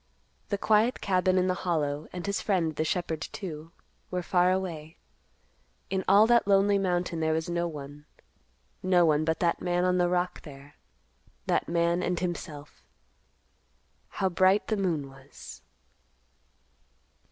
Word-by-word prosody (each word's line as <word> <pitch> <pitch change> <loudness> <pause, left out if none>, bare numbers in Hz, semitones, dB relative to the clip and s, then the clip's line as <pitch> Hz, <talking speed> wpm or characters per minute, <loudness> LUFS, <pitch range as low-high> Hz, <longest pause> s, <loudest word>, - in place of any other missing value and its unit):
The 200 - 0
quiet 220 +4 +2
cabin 185 -1 +1
in 185 - +3
the 185 - +1
Hollow, 150 -4 -1
and 180 -1 -6
his 200 0 -1
friend, 170 -6 0
the 155 - 0
shepherd, 160 -1 -2
too, 165 -4 -7 0.4
were 180 -1 -3
far 180 0 +2
away. 170 -4 -4 0.9
In 190 -1 -1
all 200 +3 +6
that 235 -2 +3
lonely 200 0 +4
mountain 180 -2 -1
there 160 0 +1
was 160 0 -2
no 170 0 0
one—no 150 - -4
one 155 -1 +2
but 160 0 0
that 170 -1 +1
man 175 0 0
on 180 0 +2
the 175 0 +2
rock 180 0 -1
there; 140 -1 -13 0.7
that - - 0
man, 170 +1 +1
and 180 -1 -1
himself. 160 -4 -6 1.3
How 195 - -1
bright 185 +2 +2
the 220 - +1
moon 165 -8 -1
was! 135 +1 -13
175 Hz, 140 wpm, -28 LUFS, 155-185 Hz, 1.3 s, all